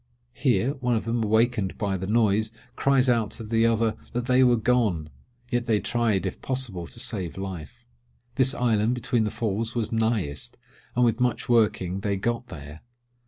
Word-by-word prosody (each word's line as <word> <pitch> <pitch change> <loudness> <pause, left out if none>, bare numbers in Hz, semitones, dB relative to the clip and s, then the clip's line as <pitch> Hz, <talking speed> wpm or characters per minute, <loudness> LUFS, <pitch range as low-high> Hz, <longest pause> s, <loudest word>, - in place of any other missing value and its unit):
Here, 130 -1 +1
one 125 -2 +1
of 110 - -2
them, 115 0 0
awakened 110 -2 +1
by 100 -3 -1
the 95 0 -4
noise, 110 0 +2 0.2
cries 135 -1 +3
out 115 -4 +2
to 115 - -7
the 115 +1 +2
other 115 -1 +2 0.2
that 120 0 -1
they 130 0 +4
were 120 -1 +5
gone!—yet 120 - -1
they 110 -3 +3
tried 115 -5 0
if 95 - -4
possible 120 -10 -3
to - - -10
save 105 -9 -3
life. 90 -7 -7 0.5
This 135 +1 +2
island 115 -2 +2
between 120 -2 0
the - - 0
Falls 110 +2 -2
was 115 -1 -1
nighest, 110 - -1 0.4
and 125 +1 +4
with 115 0 +1
much 125 -1 0
working 105 -6 +2
they 100 0 -1
got 115 +4 -2
there. 75 +1 -10
115 Hz, 170 wpm, -26 LUFS, 100-120 Hz, 0.5 s, were